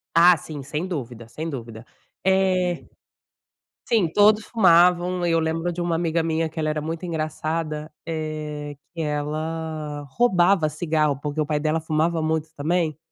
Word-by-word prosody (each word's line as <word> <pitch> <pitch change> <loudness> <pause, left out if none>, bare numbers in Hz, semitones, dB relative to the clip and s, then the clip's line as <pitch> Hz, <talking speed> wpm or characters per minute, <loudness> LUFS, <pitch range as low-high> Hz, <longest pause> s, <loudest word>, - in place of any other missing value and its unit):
Ah 175 0 +7
sim, 150 -3 -8
sem 150 +6 -3
dúvida 120 -10 -5
sem 155 +8 -5
dúvida. 115 -4 -7 0.4
Eh, 185 -2 +2 1.0
sim, 210 -8 +3
todos 210 +1 +5
fumavam 180 -3 +4
e - - +1
eu 165 - +3
lembro 165 +2 -1
de 175 - -5
uma 170 -1 0
amiga 165 0 +1
minha 160 0 0
que 160 - -10
ela 155 -1 0
era 150 0 -1
muito 165 +3 -4
engraçada, 155 -1 -3
eh, 155 -2 -4 0.2
que 165 - -3
ela 155 0 -3
roubava 185 -7 +4
cigarro 155 -3 0
porque 150 +1 -4
o - - +2
pai 150 -1 0
dela 155 +1 0
fumava 160 +1 0
muito 160 0 0
também, 160 +1 0
160 Hz, 155 wpm, -24 LUFS, 150-175 Hz, 1.0 s, Ah